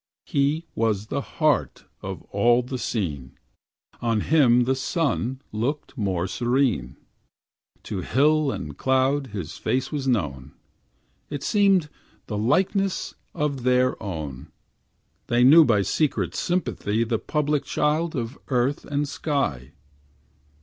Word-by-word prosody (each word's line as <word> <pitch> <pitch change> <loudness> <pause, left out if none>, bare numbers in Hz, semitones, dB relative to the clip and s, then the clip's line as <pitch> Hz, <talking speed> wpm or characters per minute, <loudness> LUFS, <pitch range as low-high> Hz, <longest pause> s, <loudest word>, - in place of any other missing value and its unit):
He 145 +4 0
was 110 -3 0
the 140 - 0
heart 150 0 0 0.2
of - - -6
all 120 +4 +3
the 125 +1 -5
scene; 75 - -3 0.6
On 115 -2 +1
him 125 -5 +4
the 130 +2 +1
sun 135 - -1
looked 130 +8 -3
more 95 -7 -1
serene; 120 - 0 0.9
To 95 -3 -4
hill 150 +7 +2
and 75 - -6
cloud 130 - +1
his 100 - -6
face 130 +1 -1
was 140 -3 -3
known, 70 - -1 0.8
It 145 -1 -5
seemed 195 -6 +3 0.4
the 105 - -5
likeness 185 - +1 0.2
of 145 -3 -1
their 125 +1 +2
own; 80 -9 -6 0.8
They 120 +1 +3
knew 155 +6 +9
by 105 -8 +3
secret 150 +8 0
sympathy 115 - -1
The 115 -1 -1
public 150 -2 0
child 155 +4 0
of 120 +1 -4
earth 130 +2 0
and 145 0 -1
sky. 135 - -2
130 Hz, 120 wpm, -24 LUFS, 110-145 Hz, 0.9 s, knew